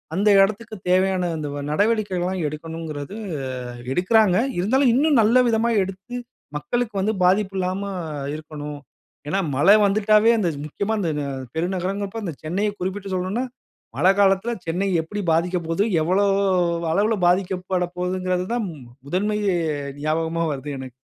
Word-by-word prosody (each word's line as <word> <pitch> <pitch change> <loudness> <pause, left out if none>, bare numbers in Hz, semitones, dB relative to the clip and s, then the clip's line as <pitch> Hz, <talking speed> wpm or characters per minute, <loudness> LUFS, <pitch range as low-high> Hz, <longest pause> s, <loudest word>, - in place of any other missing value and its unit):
அந்த 200 +4 +1
இடத்திற்கு, 215 +3 0
தேவையான 185 -1 +2
அந்த 150 -1 -4 0.2
நடவடிக்கைகள்லாம் 190 -2 0
எடுக்கணுங்கிறது 155 +1 -6 0.5
அ - - -7 0.3
எடுக்கிறாங்க. 185 +1 +4 0.2
இருந்தாலும் 245 +7 +3
இன்னும் 285 -1 +4
நல்ல 230 +4 +4
விதமா 230 +1 +2
எடுத்து 195 +6 -9 0.4
மக்களுக்கு 240 +7 -2
வந்து 215 +3 +1
பாதிப்பு 195 +2 +2
இல்லாம 185 +1 -1 0.5
இருக்கணும். 150 -2 -7 0.5
ஏன்னா, 195 +6 +1 0.2
மழ 145 - +2 0.2
வந்துட்டாவே 215 +2 +4
அந்த 185 -5 +1 0.2
முக்கியமா 200 +8 -2
இந்த, 175 - -1
இந்த 145 -1 -2 0.3
பெருநகரங்கப்ப 190 +4 -2
அந்த 170 - -3
சென்னையை 195 +7 0
குறிப்பிட்டு 190 +1 -4
சொல்லணுனா, 185 +7 -1 0.5
மழ 185 - +4
காலத்தில 195 +3 +3 0.2
சென்னை 180 +4 0
எப்பிடி 205 +6 -5
பாதிக்கப் 170 +1 0
போது, 165 +4 +1 0.2
எவ்வளவு 195 +4 +2 0.6
அளவுல 210 +5 +2
பாதிக்கப்படப்போதுங்கிறதுதான் 185 +2 -1 0.4
முதன்மை 205 +7 0 0.7
ஞாபகமா 165 +2 0
வருது 140 +1 -5
எனக்கு. 130 -1 -8
185 Hz, 120 wpm, -23 LUFS, 170-210 Hz, 0.7 s, எடுக்கிறாங்க